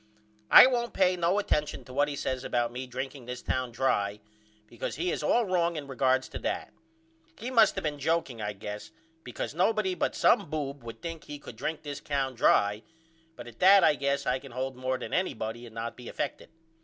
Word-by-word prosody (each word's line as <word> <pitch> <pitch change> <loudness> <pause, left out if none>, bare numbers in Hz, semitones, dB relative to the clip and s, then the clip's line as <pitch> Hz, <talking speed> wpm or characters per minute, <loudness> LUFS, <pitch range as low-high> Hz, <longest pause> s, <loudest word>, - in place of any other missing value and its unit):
I - - +11
won't 240 -2 0
pay 185 -1 +3
no 175 +2 +1
attention 150 -7 -1
to 130 - -11
what 145 +2 +2
he 145 - -4
says 130 -2 -3
about 120 -2 0
me 125 +2 -6
drinking 130 0 -6
this 125 0 -6
town 130 -1 -1
dry 105 -5 0 0.5
because 120 +2 -5
he 175 +3 -1
is - - -2
all 240 -1 +2
wrong 175 -3 +1
in 150 -2 -5
regards 130 -1 +1
to - - -6
that. - - -3 0.6
He 240 +4 -5
must 230 -4 +5
of - - -2
been 150 -2 -2
jokeing 140 -6 -1
I 105 0 -2
guess 105 +1 -7 0.3
because 125 - -5
nobody 190 +3 +1
but - - -1
some - - +3
boob 145 -2 -4
would 115 +5 -10
think 165 -2 -6
he 145 - -7
could 140 - -11
drink 155 +7 -4
this 145 -2 -5
town 135 -2 -2
dry 105 -3 +3 0.5
but - - -9
at 120 -2 -13
that 195 +1 +7
I - - +6
guess 140 0 -1
I 125 +1 +1
can 135 -2 -12
hold 130 +1 -3
more 130 0 -2
than - - -7
anybody 120 -9 -2
and 115 - -15
not 115 +1 -4
be 125 -1 -9
effected. - - -4
135 Hz, 210 wpm, -29 LUFS, 120-170 Hz, 0.6 s, I